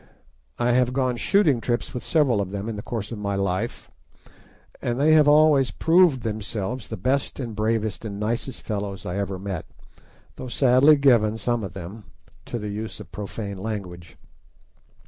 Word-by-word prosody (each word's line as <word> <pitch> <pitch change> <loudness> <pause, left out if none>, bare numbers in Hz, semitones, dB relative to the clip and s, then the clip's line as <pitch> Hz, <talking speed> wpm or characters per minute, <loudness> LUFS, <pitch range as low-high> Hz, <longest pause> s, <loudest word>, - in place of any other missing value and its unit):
I 120 0 +1
have 125 0 +2
gone 130 -2 0
shooting 150 - +2
trips 120 +2 -2
with 125 - -5
several 135 -10 +2
of 95 - -3
them 100 +2 -5
in 115 - -3
the 105 - -5
course 110 -1 -5
of 115 - -5
my 100 -1 -2
life, 95 -1 -2 0.9
and 120 +1 -2
they 155 +2 +5
have 155 -2 +6
always 150 -3 +5
proved 165 -6 +3
themselves 110 +1 -4
the 110 - -6
best 130 +10 -1
and 115 -5 -5
bravest 110 -1 -1
and 100 -2 -6
nicest 120 +4 -3
fellows 100 -3 -4
I 90 +2 -3
ever 100 -1 -3
met, 95 -3 -5 0.7
though 130 - -6
sadly 130 +4 +5
given, 120 -6 +3
some 115 +1 -1
of 95 -2 -6
them, 95 +4 -9 0.4
to - - -4
the 105 -2 -5
use 110 +2 -5
of 100 -5 -11
profane 100 -1 -6
language. 95 -5 -6
110 Hz, 170 wpm, -24 LUFS, 100-130 Hz, 0.9 s, have